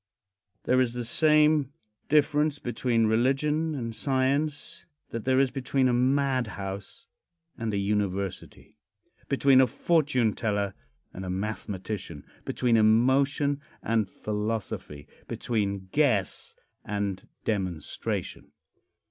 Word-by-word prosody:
There 130 Hz, 0 st, +3 dB
is 120 Hz, -2 st, 0 dB
the 120 Hz, -1 st, -3 dB
same 150 Hz, +1 st, +3 dB, 0.4 s
difference 150 Hz, 0 st, +3 dB
between 120 Hz, -2 st, 0 dB
religion 140 Hz, +8 st, +1 dB
and 115 Hz, -4 st, -4 dB
science 140 Hz, +6 st, -1 dB, 0.2 s
that 115 Hz, 0 st, -5 dB
there 130 Hz, 0 st, +3 dB
is 135 Hz, -2 st, +3 dB
between 135 Hz, 0 st, +1 dB
a 125 Hz, -, +2 dB
madhouse 125 Hz, -7 st, -1 dB, 0.5 s
and 115 Hz, -1 st, -3 dB
a 100 Hz, -, -1 dB
university 100 Hz, -2 st, -3 dB, 0.5 s
between 135 Hz, -1 st, +5 dB
a 130 Hz, -, +4 dB
fortune 130 Hz, -5 st, +1 dB
teller 100 Hz, -3 st, -1 dB, 0.4 s
and 95 Hz, -, -7 dB
a 95 Hz, -, -5 dB
mathematician 95 Hz, -3 st, -4 dB, 0.2 s
between 120 Hz, -2 st, +2 dB
emotion 135 Hz, +6 st, +3 dB, 0.2 s
and 110 Hz, -3 st, +1 dB
philosophy 105 Hz, -9 st, -4 dB, 0.2 s
between 100 Hz, -5 st, -2 dB
guess 125 Hz, -11 st, +1 dB, 0.3 s
and 100 Hz, -2 st, -3 dB, 0.2 s
demonstration. 95 Hz, -7 st, -3 dB
120 Hz, 105 wpm, -27 LUFS, 105-140 Hz, 0.5 s, between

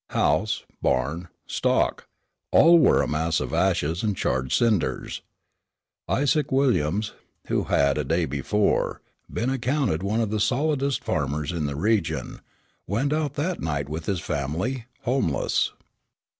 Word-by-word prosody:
House, 105 Hz, +9 st, +1 dB, 0.2 s
barn, 75 Hz, +7 st, 0 dB, 0.2 s
stock, -, -, 0 dB, 0.4 s
all, 170 Hz, +2 st, +7 dB
were 155 Hz, -, +4 dB
a -, -, -1 dB
mass 80 Hz, +2 st, 0 dB
of -, -, -4 dB
ashes 85 Hz, -3 st, +1 dB
and 105 Hz, -4 st, -1 dB
charred 65 Hz, 0 st, -1 dB
cinders. 110 Hz, -9 st, 0 dB, 0.9 s
Isaac 145 Hz, +3 st, +1 dB
Williams, 110 Hz, -, +1 dB, 0.4 s
who -, -, +1 dB
had 70 Hz, +1 st, +2 dB
a -, -, 0 dB
day 80 Hz, +4 st, +1 dB
before, 75 Hz, +10 st, 0 dB, 0.3 s
been 120 Hz, +4 st, -1 dB
accounted 130 Hz, -, 0 dB
one 105 Hz, +4 st, 0 dB
of 110 Hz, -3 st, 0 dB
the 110 Hz, -, 0 dB
solidest 140 Hz, +3 st, 0 dB
farmers 75 Hz, +3 st, -1 dB
in 80 Hz, -4 st, -2 dB
the 70 Hz, -, -4 dB
region, 80 Hz, -, -1 dB, 0.5 s
went 135 Hz, -, 0 dB
out 150 Hz, -2 st, -1 dB
that 165 Hz, +5 st, -2 dB
night 70 Hz, -3 st, -2 dB
with 80 Hz, +1 st, -5 dB
his 95 Hz, -3 st, 0 dB
family 85 Hz, -, -3 dB, 0.2 s
homeless. 120 Hz, -, +1 dB
100 Hz, 135 wpm, -25 LUFS, -, 0.9 s, all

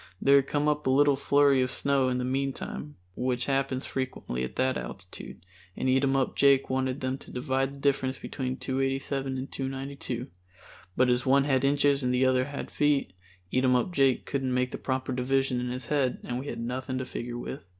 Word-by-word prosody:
There 140 Hz, +1 st, +6 dB
had 135 Hz, -1 st, +2 dB
come 145 Hz, +1 st, 0 dB
up 150 Hz, -2 st, 0 dB
a -, -, +3 dB
little 145 Hz, +1 st, +5 dB
flurry 140 Hz, -1 st, +4 dB
of 130 Hz, -, +1 dB
snow 135 Hz, 0 st, +1 dB
in 125 Hz, -, 0 dB
the 125 Hz, -, -1 dB
meantime, 135 Hz, +2 st, -3 dB, 0.2 s
which 125 Hz, -1 st, -1 dB
happens 135 Hz, -1 st, 0 dB
frequently 130 Hz, -, -3 dB
at 65 Hz, -, -5 dB
that 130 Hz, 0 st, +1 dB
altitude, 90 Hz, -2 st, -8 dB, 0.3 s
and -, -, -1 dB
Eatumup 135 Hz, 0 st, +2 dB
Jake 140 Hz, -1 st, +4 dB
wanted 130 Hz, +1 st, -1 dB
them 130 Hz, +1 st, -2 dB
to -, -, -13 dB
divide 135 Hz, +1 st, -1 dB
the -, -, -12 dB
difference 135 Hz, -2 st, +1 dB
between 130 Hz, -1 st, -4 dB
287 135 Hz, 0 st, -2 dB
and 130 Hz, +2 st, -5 dB
292, 135 Hz, -2 st, -4 dB, 0.7 s
but 130 Hz, -, +4 dB
as 125 Hz, 0 st, +2 dB
one 135 Hz, +1 st, +5 dB
had 135 Hz, -2 st, +1 dB
inches 140 Hz, 0 st, +3 dB
and 125 Hz, -1 st, 0 dB
the 125 Hz, +1 st, +3 dB
other 130 Hz, -1 st, +3 dB, 0.3 s
feet, 145 Hz, -9 st, +1 dB, 0.4 s
Eatumup 130 Hz, +4 st, +2 dB
Jake 135 Hz, -4 st, +3 dB
couldn't 135 Hz, -2 st, -1 dB
make 125 Hz, 0 st, +1 dB
the -, -, -5 dB
proper 130 Hz, 0 st, -2 dB
division 130 Hz, 0 st, +1 dB
in 125 Hz, 0 st, -2 dB
his 125 Hz, 0 st, -5 dB
head 135 Hz, -1 st, +1 dB
and 125 Hz, 0 st, -3 dB
we 135 Hz, -, -7 dB
had 120 Hz, -, -4 dB
nothing 125 Hz, +2 st, -3 dB
to 130 Hz, -, -3 dB
figure 120 Hz, -1 st, -5 dB
with. 120 Hz, -2 st, -7 dB
130 Hz, 190 wpm, -28 LUFS, 125-140 Hz, 0.7 s, There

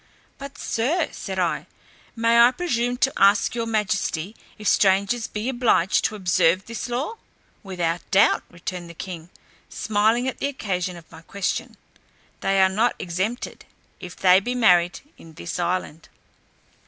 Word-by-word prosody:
"But, 280 Hz, +1 st, -9 dB
Sir," 270 Hz, +11 st, -1 dB
said -, -, -6 dB
I, -, -, -1 dB, 0.5 s
"may 230 Hz, 0 st, +3 dB
I 235 Hz, +1 st, +8 dB
presume 245 Hz, -5 st, -1 dB
to 265 Hz, +1 st, +1 dB
ask 200 Hz, +4 st, +4 dB
your 230 Hz, -1 st, -2 dB
majesty, 210 Hz, -3 st, -1 dB, 0.2 s
if 210 Hz, -, -5 dB
strangers 200 Hz, +4 st, +2 dB
be 210 Hz, +3 st, -4 dB
obliged 240 Hz, -8 st, +2 dB
to 215 Hz, -, -1 dB
observe 180 Hz, -1 st, +2 dB
this 230 Hz, +1 st, -6 dB
law?" 275 Hz, -, -3 dB, 0.4 s
"Without 175 Hz, -4 st, -3 dB
doubt," 195 Hz, -, +4 dB
returned 175 Hz, 0 st, -7 dB
the 170 Hz, -, -11 dB
king 170 Hz, -1 st, -8 dB, 0.4 s
(smiling 220 Hz, +4 st, +1 dB
at 260 Hz, -, -4 dB
the -, -, 0 dB
occasion 185 Hz, -9 st, -3 dB
of 165 Hz, -, -16 dB
my 160 Hz, -1 st, -12 dB
question), 200 Hz, +3 st, -3 dB, 0.6 s
"they 195 Hz, 0 st, +1 dB
are -, -, +6 dB
not 220 Hz, +6 st, +1 dB
exempted, 190 Hz, +8 st, -4 dB, 0.4 s
if 180 Hz, -1 st, -9 dB
they 185 Hz, 0 st, +5 dB
be 245 Hz, +5 st, -3 dB
married 180 Hz, -7 st, +3 dB, 0.2 s
in 165 Hz, -, -14 dB
this 170 Hz, +2 st, -6 dB
island." 175 Hz, -2 st, -3 dB
200 Hz, 150 wpm, -23 LUFS, 180-235 Hz, 0.6 s, I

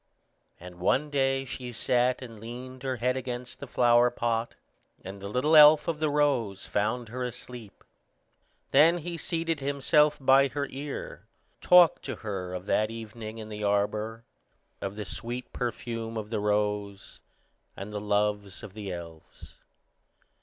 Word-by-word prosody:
And 90 Hz, 0 st, -11 dB
one 145 Hz, +11 st, +1 dB
day 135 Hz, -1 st, +1 dB
she 125 Hz, -1 st, -6 dB
sat 125 Hz, +2 st, +1 dB
and 115 Hz, -3 st, -10 dB
leaned 125 Hz, +3 st, -8 dB
her 130 Hz, -1 st, -2 dB
head 125 Hz, +1 st, 0 dB
against 125 Hz, -1 st, -5 dB
the -, -, -7 dB
flower 120 Hz, 0 st, +4 dB
pot, 120 Hz, -1 st, -2 dB, 0.5 s
and 95 Hz, +1 st, -8 dB
the 100 Hz, -, -5 dB
little 130 Hz, +9 st, +2 dB
elf 150 Hz, 0 st, +8 dB
of 165 Hz, -3 st, -1 dB
the 155 Hz, -1 st, +1 dB
rose 135 Hz, -9 st, 0 dB
found 110 Hz, +3 st, -1 dB
her 125 Hz, +2 st, -6 dB
asleep. 120 Hz, -3 st, -8 dB, 0.9 s
Then 160 Hz, +5 st, +6 dB
he 170 Hz, +1 st, -5 dB
seated 165 Hz, -1 st, -2 dB
himself 145 Hz, +2 st, +2 dB
by 135 Hz, +1 st, +5 dB
her 140 Hz, +1 st, -3 dB
ear, 140 Hz, +1 st, -7 dB, 0.3 s
talked 180 Hz, -2 st, +6 dB
to -, -, -3 dB
her 90 Hz, -3 st, -4 dB
of 90 Hz, +1 st, -6 dB
that 110 Hz, +1 st, +1 dB
evening 110 Hz, 0 st, -8 dB
in 110 Hz, -1 st, -8 dB
the 105 Hz, 0 st, -6 dB
arbor, 105 Hz, +2 st, 0 dB, 0.6 s
of 100 Hz, +1 st, -4 dB
the 105 Hz, -1 st, -5 dB
sweet 120 Hz, +6 st, -6 dB
perfume 115 Hz, -2 st, -4 dB
of 105 Hz, 0 st, -6 dB
the 110 Hz, -, -1 dB
rose, 105 Hz, -1 st, -2 dB, 0.6 s
and 100 Hz, +2 st, -7 dB
the 105 Hz, -, -3 dB
loves 105 Hz, -1 st, -1 dB
of 105 Hz, -3 st, -9 dB
the 105 Hz, -2 st, -6 dB
elves. 85 Hz, -2 st, -11 dB
120 Hz, 155 wpm, -28 LUFS, 105-135 Hz, 0.9 s, elf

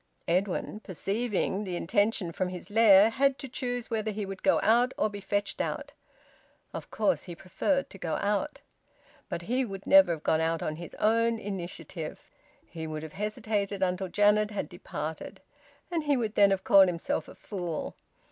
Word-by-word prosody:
Edwin, 185 Hz, +4 st, 0 dB
perceiving 200 Hz, +1 st, -2 dB
the 185 Hz, -3 st, -4 dB
intention 205 Hz, 0 st, 0 dB
from 180 Hz, +2 st, -2 dB
his 180 Hz, +2 st, -8 dB
lair, 215 Hz, -1 st, +7 dB
had 275 Hz, +2 st, +2 dB
to 270 Hz, -, -7 dB
choose 245 Hz, -1 st, -4 dB
whether 220 Hz, -1 st, -1 dB
he 210 Hz, -1 st, -3 dB
would 195 Hz, 0 st, -7 dB
go -, -, +3 dB
out 240 Hz, +4 st, +3 dB
or 215 Hz, -, +1 dB
be 205 Hz, -1 st, -7 dB
fetched 200 Hz, +1 st, -1 dB
out. -, -, -4 dB, 0.8 s
Of -, -, -7 dB
course 215 Hz, -, 0 dB
he 175 Hz, -, -7 dB
preferred 275 Hz, -, -1 dB
to 195 Hz, -, -11 dB
go 165 Hz, -3 st, -2 dB
out. 210 Hz, +9 st, -1 dB, 0.7 s
But 170 Hz, -, -4 dB
he 250 Hz, +8 st, 0 dB
would 195 Hz, -5 st, -7 dB
never 190 Hz, -3 st, +7 dB
have 155 Hz, -, -7 dB
gone 160 Hz, -, +2 dB
out 165 Hz, 0 st, 0 dB
on 155 Hz, -, -3 dB
his 170 Hz, 0 st, -9 dB
own 230 Hz, +1 st, +2 dB
initiative; 175 Hz, -5 st, -6 dB, 0.5 s
he 160 Hz, -1 st, -7 dB
would 155 Hz, 0 st, -5 dB
have 160 Hz, -, -8 dB
hesitated 205 Hz, -1 st, -2 dB
until 185 Hz, +1 st, 0 dB
Janet 210 Hz, +2 st, +3 dB
had 205 Hz, -, -4 dB
departed, 160 Hz, -3 st, -6 dB, 0.5 s
and 335 Hz, -3 st, 0 dB
he 285 Hz, -2 st, +3 dB
would 220 Hz, -3 st, -2 dB
then 200 Hz, -2 st, +6 dB
have 195 Hz, -1 st, 0 dB
called 195 Hz, -4 st, +7 dB
himself 170 Hz, -2 st, -2 dB
a -, -, -12 dB
fool. 175 Hz, -6 st, -5 dB
200 Hz, 175 wpm, -29 LUFS, 180-220 Hz, 0.8 s, lair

